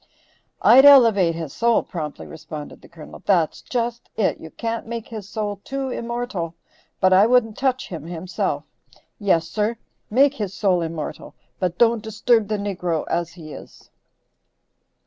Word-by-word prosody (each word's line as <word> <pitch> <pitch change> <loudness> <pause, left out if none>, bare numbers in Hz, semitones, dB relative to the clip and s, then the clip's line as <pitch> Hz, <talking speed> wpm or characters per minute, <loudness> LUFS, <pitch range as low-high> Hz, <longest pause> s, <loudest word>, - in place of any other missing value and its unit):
"I'd 260 +3 +8
elevate 225 -12 +7
his 160 -4 -6
soul," 235 0 +2
promptly 155 -4 -6
responded 155 -2 -9
the - - -15
Colonel; 160 -3 -12
"that's 175 -6 +1
just 235 -1 -3
it; 215 - +1
you 160 - -10
can't 230 +5 -4
make 230 -1 -6
his 215 -3 -8
soul 205 -2 -4
too 270 -1 -4
immortal, 235 -9 -4 0.4
but 185 -1 +4
I 195 +3 +6
wouldn't 230 -3 +3
touch 260 -1 -1
him, 165 -5 -7
himself. 175 +1 -3 0.6
Yes, 170 -6 +2
sir! 215 +5 -1 0.3
make 275 +5 +4
his 205 -7 -5
soul 185 -4 +2
immortal, 165 -2 -6 0.2
but 180 -2 -1
don't 235 -1 +3
disturb 220 0 +1
the 215 0 -1
niggro 180 -5 -2
as 170 0 -1
he 155 -4 -10
is." - - -13
205 Hz, 150 wpm, -22 LUFS, 170-235 Hz, 0.6 s, I'd